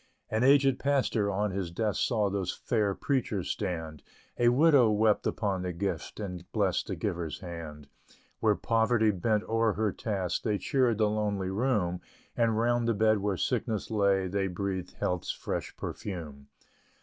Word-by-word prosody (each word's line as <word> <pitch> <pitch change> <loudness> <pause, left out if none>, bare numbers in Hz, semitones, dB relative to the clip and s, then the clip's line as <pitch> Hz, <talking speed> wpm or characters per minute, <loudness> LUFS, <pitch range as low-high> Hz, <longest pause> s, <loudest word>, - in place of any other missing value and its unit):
An 110 +2 +1
aged 135 -1 +5
Pastor, 130 -7 +1
on 100 +1 0
his 95 -2 -3
desk 105 +4 -1
Saw 110 -5 +2
those 95 -2 -1
fair 105 -4 0
preachers 130 - -1
stand; 80 -6 -4 0.4
A 120 0 +5
Widow 135 -2 +5
wept 105 0 +2
upon 100 -4 -1
the 90 -1 -3
gift, 95 +5 -4
And 90 -4 -6
blessed - - 0
the - - -3
giver's 85 +1 -3
hand. 80 -5 -8 0.5
Where 110 -2 +3
Poverty 110 0 +2
bent 105 +3 0
o'er 115 -1 +1
her 105 0 0
task, 95 -5 -2
They 105 -2 0
cheered 125 -1 +1
the 110 -1 +3
lonely 105 -3 -1
room; 100 -6 0 0.3
And 115 -2 +2
round 120 +1 +2
the 115 - +2
bed 110 0 +3
where 100 -1 -1
Sickness 110 +5 -1
lay, 100 -3 +2
They 95 +1 -1
breathed 95 0 -3
Health's 90 -1 -2
fresh - - -4
perfume. 75 -8 -6
105 Hz, 160 wpm, -29 LUFS, 95-115 Hz, 0.5 s, aged